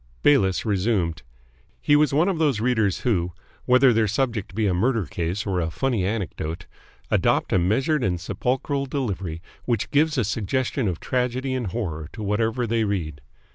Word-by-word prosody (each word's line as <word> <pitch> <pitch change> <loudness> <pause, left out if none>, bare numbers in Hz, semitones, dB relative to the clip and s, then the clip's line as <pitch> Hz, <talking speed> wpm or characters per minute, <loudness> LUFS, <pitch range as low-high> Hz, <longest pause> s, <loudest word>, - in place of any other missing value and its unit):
Bayliss 120 -11 +3
resumed. 95 -5 0 0.6
He 145 - +3
was 150 0 +4
one 155 +6 +3
of 185 -5 0
those 145 -9 +2
readers 110 -4 +1
who, 90 -8 0 0.3
whether 125 0 +5
their 110 -1 +2
subject 110 -3 -2
be 110 -1 +1
a 95 - +2
murder 110 +3 +1
case 85 +6 -3
or 95 -3 0
a 80 -2 -1
funny 120 +2 -1
anecdote, 90 -4 -3 0.5
adopt - - +2
a - - +4
measured 130 - +1
and 90 -4 0
sepulchral 135 - -2
delivery 95 - -3 0.2
which 115 -4 -1
gives 155 +1 +2
a 125 - +3
suggestion 115 +4 -1
of 90 -4 -2
tragedy 130 +1 -1
and 125 -4 -2
horror 85 -7 -4
to 110 - -6
whatever 110 +4 0
they 115 0 +1
read. 85 -9 -3
110 Hz, 170 wpm, -24 LUFS, 95-130 Hz, 0.6 s, whether